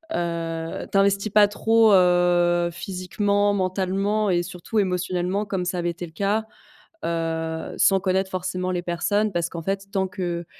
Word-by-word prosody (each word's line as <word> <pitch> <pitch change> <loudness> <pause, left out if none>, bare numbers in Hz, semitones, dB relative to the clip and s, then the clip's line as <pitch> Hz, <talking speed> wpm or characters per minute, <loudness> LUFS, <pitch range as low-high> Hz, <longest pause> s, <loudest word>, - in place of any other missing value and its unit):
heu: 165 -1 -3
«t'investis 200 +1 +2
pas 210 -1 +6
trop, 225 +1 +3
heu, 175 -1 +3
physiquement, 195 +3 -1
mentalement 195 +3 0
et 175 -1 +2
surtout 180 +5 -6
émotionnellement, 185 +1 -1
comme 190 -2 -3
ça 180 0 -2
avait 175 0 -1
été 175 +1 -5
le 160 - -13
cas, 205 +5 0 0.6
heu, 165 -1 -3
sans 195 -1 +4
connaître 190 0 0
forcément 185 0 -3
les 175 -1 -1
personnes.» 205 +5 0
parce 170 0 -1
qu'en 165 -1 -7
fait, 195 +2 -3
tant 190 -1 0
que 175 -3 -4
185 Hz, 155 wpm, -23 LUFS, 175-200 Hz, 0.6 s, pas